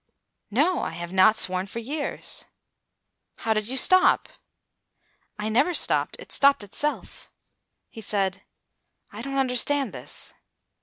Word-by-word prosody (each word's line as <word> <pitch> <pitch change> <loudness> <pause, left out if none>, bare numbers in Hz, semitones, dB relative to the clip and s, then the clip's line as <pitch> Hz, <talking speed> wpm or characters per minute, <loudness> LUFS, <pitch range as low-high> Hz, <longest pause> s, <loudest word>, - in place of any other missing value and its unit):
"No, 300 - +1
I - - -4
have 175 +1 -7
not 190 +3 +5
sworn 185 -1 +3
for 215 - -9
years." 285 +6 -4 0.9
"How 225 - 0
did 215 -1 -2
you 260 +2 -2
stop?" 370 +8 +4 1.1
"I 210 +1 -3
never 265 +11 +2
stopped. - - +1
It - - -13
stopped 280 -5 +3
itself." 295 +9 -4 0.6
He 225 - -11
said, 195 -2 -1 0.7
"I - - -7
don't 275 0 -4
understand 270 +2 +1
this." - - -7
230 Hz, 130 wpm, -25 LUFS, 200-280 Hz, 1.1 s, not